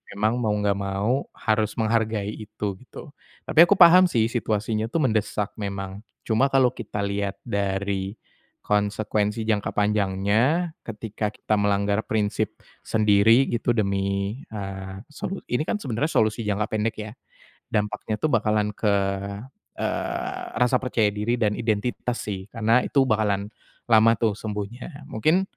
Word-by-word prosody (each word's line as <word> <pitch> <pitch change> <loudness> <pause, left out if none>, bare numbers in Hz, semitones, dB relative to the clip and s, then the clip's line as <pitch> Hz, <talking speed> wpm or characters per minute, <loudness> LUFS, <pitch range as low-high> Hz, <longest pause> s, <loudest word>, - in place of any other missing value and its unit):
memang 110 +4 +1
mau 110 -3 +1
nggak 100 -1 +1
mau 100 +7 -1
harus 110 -1 0
menghargai 110 -2 0
itu, 105 -2 -5
gitu. 135 +4 -11 0.4
Tapi 155 - +1
aku 205 - +4
paham 180 +2 +9
sih 115 -7 +2
situasinya 110 -2 -1
tuh 165 +1 +1
mendesak 110 -2 0
memang, 100 -1 -4 0.3
cuma 115 +4 +3
kalau 130 -2 +4
kita 105 - -5
lihat 100 0 -2
dari 100 -2 -2 0.5
konsekuensi 105 +1 0
jangka 105 -2 0
panjangnya, 105 - +1
ketika 110 -1 -4
kita 110 - -1
melanggar 100 +1 +1
prinsip 105 -2 -1 0.3
sendiri 110 +4 +4
gitu 120 0 0
demi, 100 +1 -1
eee, 95 -1 -6
solu 190 +5 -5
ini 125 +5 +1
kan - - 0
sebenarnya 135 - -1
solusi 110 +1 +2
jangka 105 +1 0
pendek, 110 +1 -1
ya? 105 0 -6 0.6
Dampaknya 105 +1 -1
tuh 155 - +1
bakalan 105 -2 +2
ke, 105 -2 +1 0.8
eee, - - -3
rasa 125 +1 +3
percaya 110 -4 +1
diri 105 +3 0
dan 105 -2 +2
identitas 120 +2 -1
sih, 95 -2 -5
karena 115 +1 +3
itu 140 -3 +3
bakalan 105 -3 0 0.4
lama 115 0 +6
tuh 110 -2 +1
sembuhnya. 110 - -6
Mungkin 155 - +2
110 Hz, 135 wpm, -24 LUFS, 100-115 Hz, 0.8 s, paham